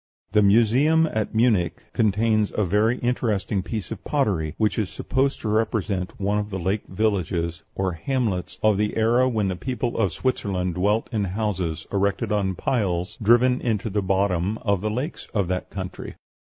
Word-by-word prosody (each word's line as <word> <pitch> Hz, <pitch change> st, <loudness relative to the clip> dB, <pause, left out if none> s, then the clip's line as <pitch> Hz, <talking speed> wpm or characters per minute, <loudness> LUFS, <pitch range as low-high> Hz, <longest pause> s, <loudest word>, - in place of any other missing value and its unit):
The 105 Hz, +1 st, +4 dB
museum 120 Hz, +10 st, +4 dB
at 110 Hz, 0 st, -2 dB
Munich 110 Hz, -8 st, +2 dB
contains 110 Hz, 0 st, +2 dB
a 105 Hz, -, +1 dB
very 105 Hz, +6 st, +2 dB
interesting 105 Hz, -5 st, 0 dB
piece 110 Hz, +1 st, -5 dB
of 110 Hz, -, -6 dB
pottery, 95 Hz, -, 0 dB
which 110 Hz, +1 st, +1 dB
is 105 Hz, -4 st, -1 dB
supposed 135 Hz, +1 st, -1 dB
to -, -, -3 dB
represent 105 Hz, -4 st, -1 dB
one 100 Hz, +1 st, +1 dB
of 105 Hz, 0 st, -4 dB
the 95 Hz, -, -3 dB
lake 95 Hz, +4 st, -2 dB
villages 90 Hz, -5 st, -1 dB
or 95 Hz, -1 st, 0 dB
hamlets 100 Hz, 0 st, -2 dB
of 105 Hz, -2 st, +4 dB
the 105 Hz, +1 st, 0 dB
era 120 Hz, +3 st, +3 dB
when 110 Hz, -5 st, 0 dB
the 95 Hz, -, -1 dB
people 125 Hz, +3 st, -3 dB
of 100 Hz, -6 st, +2 dB
Switzerland 95 Hz, -6 st, -1 dB
dwelt 105 Hz, +5 st, +1 dB
in 105 Hz, -3 st, 0 dB
houses 95 Hz, -4 st, -2 dB
erected 100 Hz, +1 st, 0 dB
on 100 Hz, -3 st, 0 dB
piles 95 Hz, -8 st, -1 dB
driven 120 Hz, +4 st, +4 dB
into 110 Hz, -2 st, -1 dB
the 105 Hz, +1 st, 0 dB
bottom 95 Hz, +1 st, 0 dB
of 100 Hz, -4 st, +1 dB
the 110 Hz, -, -1 dB
lakes 130 Hz, +10 st, -4 dB
of 100 Hz, -4 st, +1 dB
that 90 Hz, 0 st, -2 dB
country. 95 Hz, -2 st, -6 dB
105 Hz, 170 wpm, -24 LUFS, 95-115 Hz, -, The